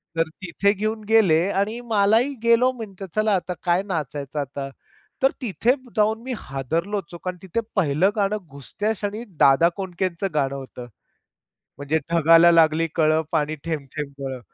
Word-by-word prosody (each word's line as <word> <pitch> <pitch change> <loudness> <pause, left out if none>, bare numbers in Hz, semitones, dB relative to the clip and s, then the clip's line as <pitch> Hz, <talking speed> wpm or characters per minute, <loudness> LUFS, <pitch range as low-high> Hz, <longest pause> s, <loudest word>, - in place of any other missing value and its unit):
तर 165 -1 0
तिथे 185 +3 +1
घेऊन 215 +2 -3
गेले 190 -8 +5 0.2
आणि 220 +4 -2
मलाही 220 +7 +3
गेलो 235 +2 +4
म्हणलं 205 -6 -8
चला 215 -1 +2
आता 180 0 -2
काय 175 +2 +2
नाचायचं 150 -5 -4
आता. 140 0 -4 0.5
तर 270 - +5
तिथे 225 +1 +1 0.2
जाऊन 220 +1 +2
मी 260 -1 -4
हादरलोच 165 +9 -3
हो, - - -6
कारण 180 +1 -5
तिथे 190 +4 -3 0.2
पहिलं 170 +1 +2
गाणं 205 0 +1
घुसत्या 140 - -4
क्षणी 210 +2 -4 0.2
दादा 140 +5 +6
कोंडकेचं 185 -1 -3
गाणं 140 -2 0
होतं. 130 -2 -9 0.9
म्हणजे 145 +3 0
ढगाला 165 +1 +6
लागली 165 0 +4
कळं, 155 -1 +3
पाणी 155 -1 0
थेंब-थेंब 150 -2 -5
गळं. 135 -2 -5
175 Hz, 150 wpm, -23 LUFS, 150-210 Hz, 0.9 s, दादा